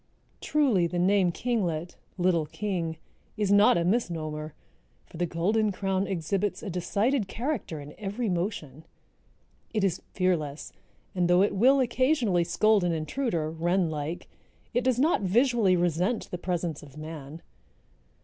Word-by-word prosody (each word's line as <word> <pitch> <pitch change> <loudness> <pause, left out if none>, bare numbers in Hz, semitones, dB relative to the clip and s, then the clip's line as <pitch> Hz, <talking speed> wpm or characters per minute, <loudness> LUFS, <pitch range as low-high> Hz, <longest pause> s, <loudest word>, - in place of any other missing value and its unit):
Truly 250 - +2
the 175 - -4
name 185 0 +3
kinglet—little 175 -5 -1
king—is 190 +2 -4
not 205 -3 +6
a 170 - +1
misnomer, 160 -7 -2 0.5
for - - -13
the 175 +1 0
Golden 205 +6 +1
crown 195 0 -1
exhibits 195 +3 -2
a 200 - -4
decided 200 +7 0
character 235 - -3
in 145 +1 -10
every 215 +3 -3
motion. 170 - -3 0.9
It 210 - +1
is 185 -3 0
fearless 160 -6 -1 0.4
and 180 -2 +1
though 175 +2 +5
it 205 - +1
will 260 +7 +5
occasionally 250 - +2
scold 215 +3 +3
an 175 -1 +1
intruder, 160 - -2
wren 170 +1 0
like, 155 +3 -4 0.5
it 245 +1 +1
does 255 -1 +2
not 300 +2 +2
visually 220 0 +3
resent 175 +6 0
the 180 - -4
presence 175 -4 -2
of 145 -1 -14
man. 155 0 -8
185 Hz, 135 wpm, -27 LUFS, 165-215 Hz, 0.9 s, not